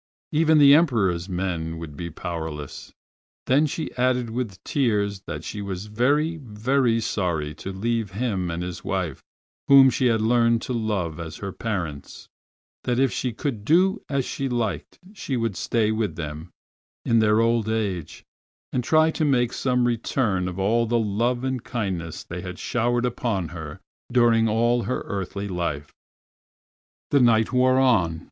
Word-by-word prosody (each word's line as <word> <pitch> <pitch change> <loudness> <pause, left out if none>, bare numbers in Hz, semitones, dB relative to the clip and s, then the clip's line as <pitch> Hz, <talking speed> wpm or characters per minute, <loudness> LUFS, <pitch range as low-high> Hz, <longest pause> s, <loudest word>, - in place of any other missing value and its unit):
Even 160 0 +4
the 140 -1 +8
Emperors 105 - +2
men 85 -3 -3
would 80 -3 -8
be 85 +3 -5
powerless. 80 -4 -6 0.5
Then 145 +4 +3
she 155 +2 -4
added 125 -2 +1
with 115 -6 -4
tears 105 -7 0
that - - -5
she 105 - -5
was 95 -1 -5
very, 145 +10 +1
very 120 -1 0
sorry 85 -9 -2
to 95 - -5
leave 110 +2 -1
him 95 -3 -2
and 85 +1 -3
his 90 -1 -6
wife, 90 -8 -2 0.5
whom 135 -1 +8
she 130 - +1
had 115 -2 +2
learned 115 +1 +2
to 130 - -3
love 100 -8 -2
as 80 -2 -6
her 100 -1 -5
parents, 90 -11 -5 0.6
that 120 -1 0
if 135 -1 +3
she 125 - -2
could 115 -2 -4
do 185 - +3
as 140 -3 0
she 135 -1 -3
liked 115 -6 -3 0.2
she 140 -10 -3
would 115 -4 -1
stay 110 +1 0
with 110 -6 -1
them 80 +1 -6 0.6
in 115 -1 +3
their 110 0 +4
old 115 -1 +2
age, 100 -8 -3 0.5
and 125 - 0
try 155 +4 +4
to 160 - -2
make 125 -5 +2
some 125 -2 +1
return 110 -5 0
for 90 - -8
all 115 +4 +2
the 120 +1 +2
love 115 +3 0
and 130 -2 -2
kindness 95 -9 -4
they - - -7
had - - -7
showered 120 +1 0
upon 110 -8 -2
her 80 -3 -8 0.3
during 115 -2 +4
all 120 +2 +2
her 125 - -2
earthly 100 0 -4
life. 85 -6 -3 1.2
The 140 - +5
night 115 -1 +3
wore 130 +1 +4
on! 95 -12 +3
110 Hz, 160 wpm, -24 LUFS, 90-125 Hz, 1.2 s, the